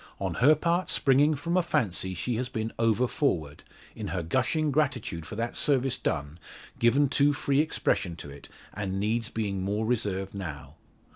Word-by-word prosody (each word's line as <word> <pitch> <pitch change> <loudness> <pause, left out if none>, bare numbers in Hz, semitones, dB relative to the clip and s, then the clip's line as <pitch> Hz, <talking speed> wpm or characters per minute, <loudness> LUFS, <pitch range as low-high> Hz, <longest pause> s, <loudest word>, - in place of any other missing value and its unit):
On - - -2
her 145 +6 +5
part 170 +4 0
springing 145 +3 +4
from 170 +5 -2
a 185 - +5
fancy 105 - -1
she 120 +7 -2
has 125 +1 -2
been 110 0 -3
over 115 +2 +3
forward 80 - -1 0.3
in - - -5
her 85 +2 -2
gushing 130 - 0
gratitude 125 - -1
for 105 - -7
that 115 +2 -3
service 135 -2 +1
done, 75 0 -3 0.4
given 135 +5 +4
too 145 +2 +3
free 140 -1 +1
expression 125 - 0
to 75 -3 -9
it, 70 - -12 0.2
and 95 -2 -3
needs 115 +3 0
being 100 -4 -2
more 105 +3 -1
reserved 100 -5 -1
now. 75 -8 -7
115 Hz, 170 wpm, -28 LUFS, 95-140 Hz, 0.4 s, her